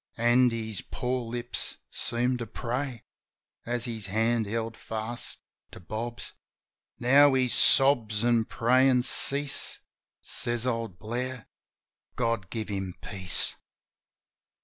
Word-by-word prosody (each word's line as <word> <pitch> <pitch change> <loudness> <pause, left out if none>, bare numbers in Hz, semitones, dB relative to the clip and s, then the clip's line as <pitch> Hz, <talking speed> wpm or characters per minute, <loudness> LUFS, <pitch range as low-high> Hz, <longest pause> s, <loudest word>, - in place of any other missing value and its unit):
An' 120 +2 +4
his 110 -4 -4
poor 125 0 -2
lips 120 +1 -5
seemed 125 +1 -1
to 115 - -5
pray. 125 +2 -4 0.6
As 120 0 -2
his 110 -5 -5
hand 110 +2 +1
held 115 +1 -3
fast 110 +2 -6 0.3
to - - -12
Bob's... 115 +6 -6 0.6
Now 135 +3 +5
his 130 -2 +1
sobs 120 -6 +4
an' 120 -2 +3
prayin' 125 +2 +3
cease. 140 +2 +2 0.4
Says 120 0 0
old 115 -6 -3
Blair, 120 +3 -5 0.7
"God 115 -6 -1
give 110 -2 -5
him 95 -3 -4
peace! 95 -4 +3
120 Hz, 110 wpm, -27 LUFS, 110-125 Hz, 0.7 s, Now